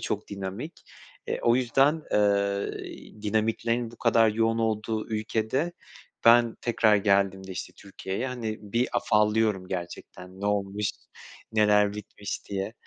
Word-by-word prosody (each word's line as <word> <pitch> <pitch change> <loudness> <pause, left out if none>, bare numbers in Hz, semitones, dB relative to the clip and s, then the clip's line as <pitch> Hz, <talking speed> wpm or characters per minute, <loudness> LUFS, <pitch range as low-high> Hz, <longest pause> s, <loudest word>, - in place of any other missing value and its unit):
çok - - -3
dinamik. 100 - -6 0.4
Eee, - - -2
yüzden, 135 +5 +2
eee, 100 0 -1
dinamiklerin 115 +2 0
bu 120 - -14
kadar 115 -1 +4
yoğun 115 +1 +1
olduğu 110 -1 -1
ülkede 110 +8 -1 0.5
ben 115 0 +6
tekrar 110 -3 +3
geldiğimde, 100 -1 +1
işte, - - -6
Türkiye'ye, 100 +4 -5
hani, 115 -4 -4
bir 120 +2 +2
afallıyorum 105 -2 +2
gerçekten, 90 +1 -7
"Ne 100 - -2
olmuş, 100 0 0 0.6
neler 105 -1 +4
bitmiş?" 105 -1 -6
diye. 100 +1 -3
105 Hz, 115 wpm, -27 LUFS, 100-115 Hz, 0.6 s, ben